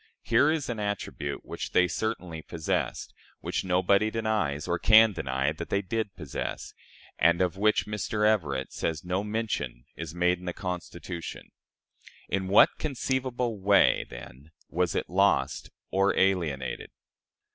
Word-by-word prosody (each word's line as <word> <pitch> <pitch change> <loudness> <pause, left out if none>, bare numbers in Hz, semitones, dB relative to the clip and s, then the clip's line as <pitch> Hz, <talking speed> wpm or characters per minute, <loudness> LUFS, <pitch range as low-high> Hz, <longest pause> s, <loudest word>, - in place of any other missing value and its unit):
Here 120 +6 +4
is 155 -3 0
an 120 -3 -3
attribute 100 -8 -4
which - - -6
they 90 - +5
certainly 90 -7 -3
possessed 80 0 -3 0.3
which - - -2
nobody 95 +3 +3
denies, 110 -10 -1
or 85 0 0
can 110 +1 +7
deny, 65 -3 -1
that 80 +2 -7
they 100 0 0
did 110 0 -3
possess 75 -6 -5 0.5
and 85 +2 +4
of 90 -1 +1
which 105 +2 +2
Mr. 105 0 -1
Everett 75 -11 +1
says 80 -1 -3
no 90 +2 -1
mention 105 - -3
is 80 0 -7
made 90 0 +2
in 90 - -11
the 90 - -3
Constitution. 85 -2 -6 0.8
In 95 -1 -1
what 100 +2 +5
conceivable 125 -5 -2
way, 100 +1 +4
then, 60 +4 -11 0.2
was 90 0 0
it - - -1
lost 100 +3 +1 0.2
or 95 +1 +2
alienated? 75 -10 0
95 Hz, 140 wpm, -28 LUFS, 85-110 Hz, 0.8 s, can